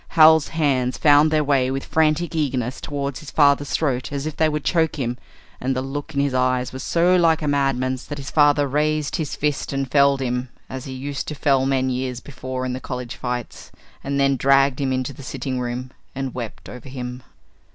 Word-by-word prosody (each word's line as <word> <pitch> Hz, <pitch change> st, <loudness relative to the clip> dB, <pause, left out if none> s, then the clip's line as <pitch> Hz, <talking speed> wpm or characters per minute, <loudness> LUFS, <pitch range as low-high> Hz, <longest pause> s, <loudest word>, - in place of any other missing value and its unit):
Hal's 160 Hz, -1 st, +7 dB
hands 135 Hz, -6 st, 0 dB
found 145 Hz, +1 st, +5 dB
their 155 Hz, -1 st, +2 dB
way 135 Hz, -3 st, +2 dB
with 135 Hz, +1 st, -3 dB
frantic 160 Hz, +2 st, +1 dB
eagerness 130 Hz, -5 st, -1 dB
toward 140 Hz, -2 st, -4 dB
his 155 Hz, -3 st, -10 dB
father's 145 Hz, -1 st, +3 dB
throat 135 Hz, -5 st, -1 dB
as 140 Hz, 0 st, -3 dB
if 155 Hz, -1 st, -4 dB
they 160 Hz, -1 st, +2 dB
would 150 Hz, -1 st, -3 dB
choke 165 Hz, -3 st, +1 dB
him, 125 Hz, -5 st, -2 dB, 0.4 s
and 130 Hz, +1 st, -1 dB
the 130 Hz, -, -1 dB
look 145 Hz, +3 st, -6 dB
in -, -, +1 dB
his 140 Hz, -2 st, 0 dB
eyes 130 Hz, 0 st, +1 dB
was 130 Hz, -, -6 dB
so 175 Hz, +6 st, +3 dB
like 165 Hz, -2 st, +3 dB
a -, -, -1 dB
madman's 130 Hz, -2 st, 0 dB
that 145 Hz, -, -5 dB
his 135 Hz, -2 st, -7 dB
father 145 Hz, -1 st, +4 dB
raised 150 Hz, +1 st, 0 dB
his 155 Hz, -3 st, -3 dB
fist 150 Hz, -1 st, -1 dB
and 135 Hz, -2 st, -2 dB
felled 140 Hz, -1 st, +4 dB
him 125 Hz, -1 st, -2 dB, 0.2 s
as 130 Hz, -1 st, -6 dB
he 135 Hz, -, -7 dB
used 140 Hz, +2 st, -5 dB
to 150 Hz, -, -4 dB
fell 135 Hz, -2 st, +2 dB
men 130 Hz, -1 st, +1 dB
years 125 Hz, -1 st, -3 dB
before 130 Hz, -1 st, -6 dB
in 125 Hz, -, -2 dB
the 130 Hz, -, -4 dB
college 125 Hz, -2 st, -6 dB
fights, 125 Hz, -2 st, -5 dB, 0.3 s
and 140 Hz, 0 st, -1 dB
then 140 Hz, -1 st, +3 dB
dragged 135 Hz, 0 st, +3 dB
him 135 Hz, -1 st, 0 dB
into 130 Hz, +1 st, -2 dB
the 140 Hz, -, -12 dB
sitting 130 Hz, 0 st, -4 dB
room 125 Hz, +1 st, -4 dB, 0.2 s
and 135 Hz, -1 st, -3 dB
wept 120 Hz, -4 st, -7 dB
over 125 Hz, +2 st, -10 dB
him. 125 Hz, -1 st, -6 dB
135 Hz, 210 wpm, -22 LUFS, 130-145 Hz, 0.4 s, Hal's